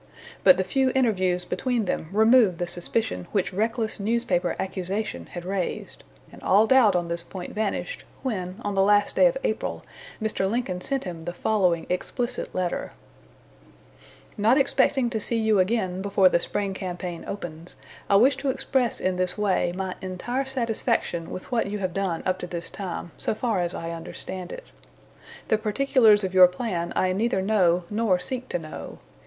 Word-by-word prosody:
But 185 -2 +7
the 190 - +1
few 265 +5 +1
interviews 185 -8 +2
between 235 +4 -1
them 160 -3 -2
removed 220 -2 +5
the 175 - -1
suspicion 175 - -2
which 195 -2 0
reckless 220 +3 -1
newspaper 200 -5 0
accusation 190 +3 -3
had 175 -1 -8
raised; 190 -1 -4 0.3
and - - -14
all 205 +3 +4
doubt 225 -5 +5
on 175 -1 0
this 170 0 -1
point 180 +1 -8
vanished, 220 - -3 0.2
when, 190 -7 -3
on 205 - -2
the 195 - +2
last 205 +1 +3
day - - +6
of - - 0
April, - - -2 0.4
Mr. 215 -3 -1
Lincoln 200 -6 -2
sent 270 +7 0
him 170 -3 -7
the 175 - -4
following 180 -4 +1
explicit 240 +7 -3
letter: 180 -1 -2 1.5
"Not 225 +6 +4
expecting 270 -2 +2
to 220 - -1
see 230 +2 0
you 220 -2 +3
again 185 -2 0
before 195 -1 +4
the 170 - +2
spring 200 +2 -2
campaign 180 -2 -5
opens, 175 -3 -7 0.3
I 200 - +5
wish 255 +7 +5
to 275 0 -2
express 255 -2 0
in 185 -1 0
this 185 +2 0
way 200 -4 +1
my 190 -1 -3
entire 240 +9 -3
satisfaction 230 -8 -1
with 185 - -8
what 235 -4 +1
you 205 +1 -3
have 185 -3 -3
done 190 -4 -2
up 185 0 0
to 180 - -5
this 170 -1 -5
time, 180 -3 -5
so - - -1
far 220 -3 0
as 175 -1 -2
I 165 0 -4
understand 175 +2 -6
it. - - -8 0.8
The 220 - +3
particulars 220 -2 +4
of 190 -1 -2
your 185 -1 +9
plan 180 -3 -3
I 185 0 +2
neither 220 +1 +1
know 180 -4 +3
nor 210 -3 +2
seek 250 +8 -4
to - - -1
know. 155 -2 -8
195 Hz, 175 wpm, -25 LUFS, 180-225 Hz, 1.5 s, your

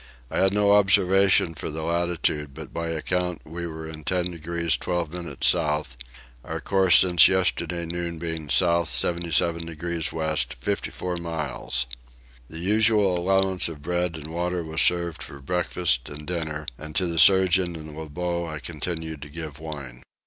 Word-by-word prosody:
I - - -1
had 95 0 +4
no 100 0 +3
observation 95 -3 +4
for 80 - -6
the 80 +1 -5
latitude 85 -4 -1
but - - -9
by 85 0 -3
account 90 +2 -2
we 85 +2 -6
were 80 -1 -7
in 80 -1 -9
10 90 +3 0
degrees 85 -1 -1
12 85 +3 -3
minutes 90 -1 -1
south; 75 -6 0 0.5
our - - -5
course 95 -3 +4
since 90 -3 +7
yesterday 90 -2 0
noon 85 0 -4
being 80 -2 -4
south 85 -1 +3
77 85 +5 +1
degrees 85 0 -3
west 80 -6 -1
54 90 -1 -3
miles. 75 -7 -3 0.6
The 80 - -8
usual 105 +1 +3
allowance 95 0 +1
of 75 -3 -10
bread 90 +1 -1
and 80 +1 -7
water 90 0 -1
was 80 0 0
served 85 -2 +2
for 70 - -8
breakfast 85 -4 0
and 75 +1 -8
dinner, 80 -3 -4
and 75 0 -9
to 90 - +2
the 85 -1 -1
surgeon 95 -2 +5
and 80 -1 -9
Lebogue 85 +2 -3
I 75 - -5
continued 80 -1 -5
to 75 - -9
give 80 -2 -7
wine. 70 -6 -8
85 Hz, 160 wpm, -25 LUFS, 80-90 Hz, 0.6 s, since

